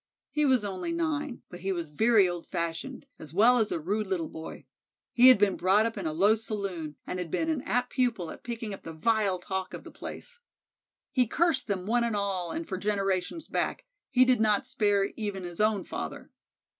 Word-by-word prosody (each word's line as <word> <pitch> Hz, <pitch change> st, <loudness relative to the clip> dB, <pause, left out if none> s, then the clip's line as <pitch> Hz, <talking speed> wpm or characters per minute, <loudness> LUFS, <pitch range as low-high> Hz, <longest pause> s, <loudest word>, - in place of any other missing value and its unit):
He 300 Hz, -1 st, +1 dB
was 255 Hz, -5 st, +3 dB
only 195 Hz, -, -3 dB
nine, 300 Hz, -5 st, -2 dB
but 175 Hz, -, -10 dB
he 190 Hz, +2 st, -2 dB
was 170 Hz, -4 st, -3 dB
very 215 Hz, +5 st, +4 dB
old 175 Hz, -1 st, -5 dB
fashioned, 165 Hz, -1 st, -4 dB
as 155 Hz, +1 st, -11 dB
well 240 Hz, +5 st, +6 dB
as 220 Hz, -, +1 dB
a -, -, -1 dB
rude 205 Hz, +6 st, -1 dB
little 175 Hz, -4 st, -2 dB
boy. 160 Hz, 0 st, -9 dB, 0.5 s
He 250 Hz, +1 st, +7 dB
had 255 Hz, -, +9 dB
been 200 Hz, -2 st, +3 dB
brought 195 Hz, +5 st, +3 dB
up 230 Hz, -, -2 dB
in 195 Hz, -5 st, -3 dB
a -, -, -1 dB
low 195 Hz, +7 st, +4 dB
saloon, 200 Hz, -8 st, -4 dB
and 180 Hz, -, -4 dB
had 175 Hz, -2 st, -4 dB
been 320 Hz, -, 0 dB
an 300 Hz, -5 st, -1 dB
apt 250 Hz, 0 st, 0 dB
pupil 235 Hz, -, 0 dB
at -, -, -10 dB
picking 230 Hz, -3 st, -5 dB
up 195 Hz, -, -8 dB
the 165 Hz, -, -8 dB
vile 205 Hz, +2 st, +1 dB
talk 190 Hz, +1 st, -4 dB
of -, -, -9 dB
the -, -, -11 dB
place. -, -, -9 dB, 0.7 s
He 255 Hz, -4 st, +2 dB
cursed 330 Hz, +4 st, +1 dB
them 190 Hz, -3 st, -2 dB
one 235 Hz, +3 st, +2 dB
and 230 Hz, -2 st, 0 dB
all 195 Hz, -4 st, -1 dB
and 330 Hz, 0 st, -4 dB
for 190 Hz, -, -3 dB
generations 200 Hz, -, -1 dB
back; -, -, -2 dB, 0.2 s
he 255 Hz, 0 st, +5 dB
did 250 Hz, -3 st, +3 dB
not 215 Hz, +3 st, +3 dB
spare 205 Hz, -6 st, +1 dB
even 205 Hz, -3 st, -3 dB
his 175 Hz, +2 st, -4 dB
own 215 Hz, -2 st, +2 dB
father. -, -, -6 dB
205 Hz, 210 wpm, -28 LUFS, 185-240 Hz, 0.7 s, had